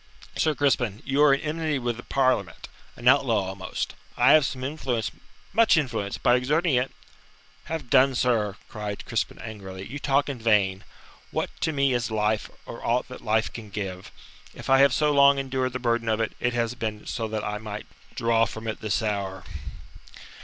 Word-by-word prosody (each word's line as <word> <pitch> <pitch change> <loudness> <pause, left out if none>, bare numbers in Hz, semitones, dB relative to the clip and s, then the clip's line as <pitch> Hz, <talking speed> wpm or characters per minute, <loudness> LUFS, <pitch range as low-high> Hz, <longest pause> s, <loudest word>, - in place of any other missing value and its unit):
"Sir 155 -1 +1
Crispin, 125 -7 +1
you 135 +2 +1
are 150 -1 +7
in 140 - +2
enmity 155 -1 -1
with 120 -3 -2
the - - -7
Parliament 130 -1 0 0.3
an 120 - -4
outlaw 120 -8 +4
almost. 95 -1 -4 0.2
I 125 +3 +6
have 155 -3 +6
some 130 -1 -5
influence 130 -6 -2 0.4
much 225 -6 +5
influence. 115 -9 -1
By 120 - +4
exerting 150 +6 +1
it 125 +1 +1 0.4
" - - -30
"Have 160 -5 -4
done, 135 -1 +5
sir!" 110 -5 +1
cried 105 -1 -6
Crispin - - -2
angrily. 95 -4 -8
"You 140 +8 -6
talk 140 0 +2
in 140 -4 -4
vain. 100 -4 +2 0.4
What - - -2
to 160 - +1
me 140 -3 +2
is 120 -1 0
life, 110 0 0 0.2
or 115 - -9
aught 125 +2 0
that 125 - -9
life 110 0 0
can 110 -3 -8
give? 95 -2 -5 0.4
If - - -5
I 135 - +7
have 140 0 +6
so 150 +3 +2
long 140 -1 +6
endured 130 -2 -1
the - - -1
burden 120 -2 0
of 110 0 +1
it, 115 - 0
it 120 0 0
has 120 -1 0
been 110 -3 -4
so 115 - -3
that 110 -1 -3
I 105 0 -3
might 105 -1 -6 0.3
draw 115 0 +3
from 110 +1 -7
it 110 - -4
this 110 +1 0
hour. 100 -3 -2
120 Hz, 190 wpm, -26 LUFS, 105-135 Hz, 0.4 s, are